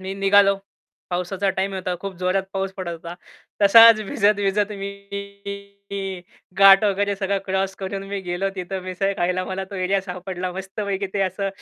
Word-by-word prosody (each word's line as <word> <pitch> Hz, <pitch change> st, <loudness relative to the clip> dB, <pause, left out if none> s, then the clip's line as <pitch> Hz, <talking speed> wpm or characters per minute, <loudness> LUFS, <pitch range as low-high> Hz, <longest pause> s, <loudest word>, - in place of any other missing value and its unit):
मी 190 Hz, +1 st, -5 dB
निघालो 195 Hz, 0 st, +4 dB, 0.5 s
पावसाचा 180 Hz, +2 st, -1 dB
टाईम 195 Hz, +1 st, -1 dB
होता 185 Hz, -1 st, -3 dB
खूप 195 Hz, 0 st, -5 dB
जोरात 185 Hz, +1 st, +1 dB
पाऊस 195 Hz, 0 st, -2 dB
पडत 185 Hz, -3 st, -4 dB
होता. 170 Hz, +1 st, -8 dB, 0.5 s
तसाच 225 Hz, +2 st, +8 dB
भिजत-भिजत 205 Hz, 0 st, +1 dB
मी 200 Hz, -1 st, -7 dB, 0.3 s
घाट 195 Hz, +1 st, +8 dB
वगैरे 200 Hz, 0 st, +1 dB
सगळं 195 Hz, 0 st, -1 dB
क्रॉस 190 Hz, 0 st, -1 dB
करून 195 Hz, +1 st, -4 dB
मी 200 Hz, 0 st, -3 dB
गेलो 180 Hz, +1 st, -2 dB
तिथं 190 Hz, 0 st, -4 dB
मिसळ 185 Hz, +2 st, -1 dB
खायला 180 Hz, +1 st, 0 dB
मला 190 Hz, +1 st, -4 dB
तो -, -, -7 dB
एरिया 190 Hz, +1 st, 0 dB
सापडला 185 Hz, -1 st, -5 dB
मस्तपैकी 195 Hz, +1 st, -4 dB
ते 200 Hz, -, 0 dB
असं 195 Hz, +1 st, -1 dB
195 Hz, 155 wpm, -22 LUFS, 185-200 Hz, 0.5 s, तसाच